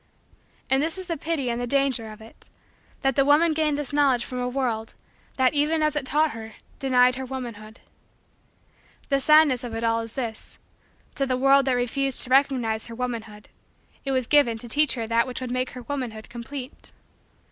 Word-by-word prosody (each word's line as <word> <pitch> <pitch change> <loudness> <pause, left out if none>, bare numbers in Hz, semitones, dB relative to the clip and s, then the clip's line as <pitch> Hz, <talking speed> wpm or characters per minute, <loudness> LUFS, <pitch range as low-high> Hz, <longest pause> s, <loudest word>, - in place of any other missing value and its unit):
And 265 +1 +3
this 325 +4 -2
is 375 - -6
the 340 -2 -2
pity 295 -5 -2
and 235 +1 -3
the 245 - -3
danger 260 -4 0
of 215 +1 -12
it: 220 - -14 0.5
that 270 -2 +2
the 275 - +4
woman 305 +4 +4
gained 305 -2 +1
this 290 -2 -4
knowledge 275 -5 +3
from 250 - -5
a 250 0 -1
world, 240 -4 -2 0.4
that, 260 0 +3
even 305 +2 +2
as 305 0 +1
it 275 -3 0
taught 305 +2 +2
her, 220 -1 -9 0.3
denied 255 -1 +3
her 265 - -4
womanhood. 230 -4 -8 1.3
The 275 -1 +2
sadness 295 -3 +4
of 235 -2 -5
it 225 - -4
all 230 0 +2
is 225 0 -8
this: 230 -4 -6 0.6
to 275 - -1
the 255 -1 0
world 275 +1 +4
that 265 - +2
refused 250 +2 -1
to 255 - -10
recognize 255 -5 +2
her 230 - -8
womanhood, 225 -4 -5 0.5
it 275 - -2
was 260 -2 +1
given 245 -5 +3
to 240 - -7
teach 290 +4 +3
her 230 -2 -3
that 230 +2 +1
which 250 - -4
would 255 -1 -5
make 255 0 -1
her 250 -1 -8
womanhood 240 -5 -5
complete. 250 +3 -9
255 Hz, 195 wpm, -24 LUFS, 235-280 Hz, 1.3 s, the